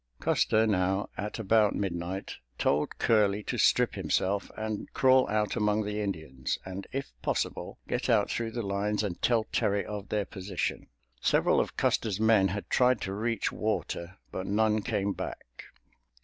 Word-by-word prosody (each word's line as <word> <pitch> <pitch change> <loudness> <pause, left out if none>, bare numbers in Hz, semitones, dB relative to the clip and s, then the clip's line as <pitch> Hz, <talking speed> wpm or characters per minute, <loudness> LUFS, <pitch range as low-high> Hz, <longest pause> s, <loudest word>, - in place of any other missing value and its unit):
Custer 110 +1 +3
now 95 -1 +1
at 105 +1 -4
about 110 -1 +3
midnight 95 0 -3 0.2
told 75 +1 +1
Curley 105 -2 +3
to - - -3
strip - - +4
himself 100 +2 0
and 110 -1 -4
crawl 130 0 +5
out 105 -1 0
among 105 -1 +1
the 105 +1 -2
Indians, 80 -10 -3
and 95 +1 -6
if 135 +1 -4
possible, - - -2
get - - -2
out - - +3
through 115 -1 -1
the 120 - -2
lines 105 +2 0
and 95 -4 -4
tell 115 -3 +3
Terry 100 0 +1
of 105 -1 -6
their 105 -2 0
position. 95 -3 -4 0.3
Several - - +3
of - - -2
Custer's 105 -3 +1
men 110 -3 +5
had 100 +2 -4
tried 125 -2 +3
to 95 - -3
reach 115 +2 -1
water, 85 +3 -3
but 95 - -4
none 110 +1 +2
came 100 0 -1
back. - - -7
105 Hz, 160 wpm, -29 LUFS, 95-110 Hz, 0.3 s, crawl